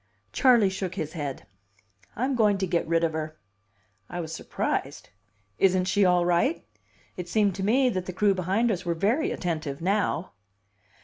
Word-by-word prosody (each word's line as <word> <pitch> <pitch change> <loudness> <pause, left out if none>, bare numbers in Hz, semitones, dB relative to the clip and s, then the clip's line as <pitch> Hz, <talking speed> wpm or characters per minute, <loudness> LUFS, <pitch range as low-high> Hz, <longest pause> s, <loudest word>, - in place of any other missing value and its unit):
Charley 235 -7 +4
shook 190 -1 -4
his 155 -4 -4
head. 145 -5 -5 0.7
"I'm 260 +4 0
going 210 -5 +3
to 190 - -1
get 170 -1 -1
rid 165 0 +1
of 165 -1 +1
her." 155 0 -4 0.7
I 175 - -5
was 160 -1 -5
surprised. - - -3 0.5
"Isn't 185 -1 +3
she 195 +1 +2
all 180 -1 +3
right?" 175 - +1 0.5
It 180 -1 -6
seemed 205 0 +2
to 190 - -3
me 255 +6 +3
that 185 -5 -3
the - - -3
crew 200 +2 +3
behind 195 +6 +1
us 185 -3 -3
were 170 -2 -1
very 220 - +1
attentive 155 -5 -3
now. 185 -1 0
185 Hz, 170 wpm, -26 LUFS, 170-205 Hz, 0.7 s, Charley